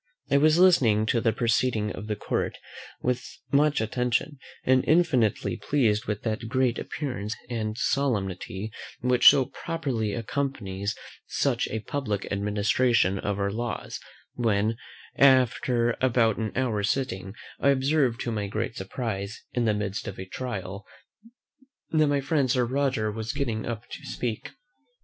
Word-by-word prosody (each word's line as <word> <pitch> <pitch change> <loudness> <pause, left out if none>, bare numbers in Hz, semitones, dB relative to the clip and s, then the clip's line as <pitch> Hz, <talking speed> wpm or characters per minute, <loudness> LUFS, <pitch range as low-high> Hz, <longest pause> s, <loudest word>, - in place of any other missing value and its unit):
I 140 - +5
was 155 +3 +5
listening 125 - +5
to 115 +1 +1
the 115 -1 +3
proceeding 115 -2 +1
of 100 +3 -7
the 105 - -1
court - - -2 0.5
with 125 0 0 0.3
much 145 +1 +3
attention, 125 +5 -1 0.2
and 130 0 +4
infinitely 130 - +2
pleased 110 -1 +1
with 105 -2 -3
that 115 0 -2
great 130 -2 +1
appearance 115 -8 -4 0.2
and 110 -2 -2
solemnity 105 -6 -1 0.3
which 125 0 +4
so 135 -2 +4
properly 135 -13 -3
accompanies 115 -5 -3 0.3
such - - 0
a 110 - -3
publick 105 -5 -3
administration 105 0 +2
of 100 0 -2
our 100 0 0
laws; 120 +3 -4 0.3
when, 110 -2 +1 0.4
after 125 -2 +4
about 115 -4 +3
an 110 -2 -2
hour's 110 -6 0
sitting, 95 -7 -2 0.2
I 140 - +3
observed 135 -2 +2
to 120 - -2
my 105 -2 -2
great 115 +3 -3
surprise, 100 0 -4
in 120 -1 +1
the 110 - +3
midst 100 -1 -3
of 100 - -6
a 95 - -6
trial, 100 -3 -5 1.1
that 155 -2 +4
my 145 -1 +1
friend 140 -1 +1
Sir 125 0 +2
Roger 130 -4 0
was 110 +4 -4
getting 120 -7 -2
up 115 -1 -5
to - - -8
speak. 115 -3 -4
115 Hz, 145 wpm, -26 LUFS, 105-130 Hz, 1.1 s, I